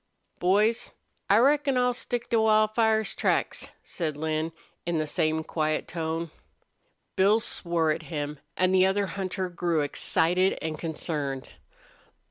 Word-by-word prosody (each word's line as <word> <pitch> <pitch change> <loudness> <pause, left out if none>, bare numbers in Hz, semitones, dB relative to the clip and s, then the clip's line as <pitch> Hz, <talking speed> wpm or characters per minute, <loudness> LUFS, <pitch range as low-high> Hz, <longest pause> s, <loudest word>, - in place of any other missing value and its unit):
"Boys, 210 +5 +2 0.3
I 200 - +6
reckon 275 +2 +3
I'll 250 0 +3
stick 245 -1 -4
to 230 -1 +4
Wildfire's 220 0 +3
tracks," - - 0
said 155 -4 -4
Lin, 155 +1 -1 0.3
in 170 -1 -1
the 155 - 0
same 160 0 0
quiet 155 -1 -1
tone. 165 -1 -3 0.8
Bill 200 +4 +4
swore 170 -7 0
at - - -2
him, 150 -2 -4 0.2
and 185 0 +3
the 185 0 +5
other 200 +1 +1
hunter 190 -1 -3
grew 170 -2 0
excited 175 +5 +1
and 155 -1 -4
concerned. 150 -5 -3
175 Hz, 130 wpm, -27 LUFS, 160-215 Hz, 0.8 s, I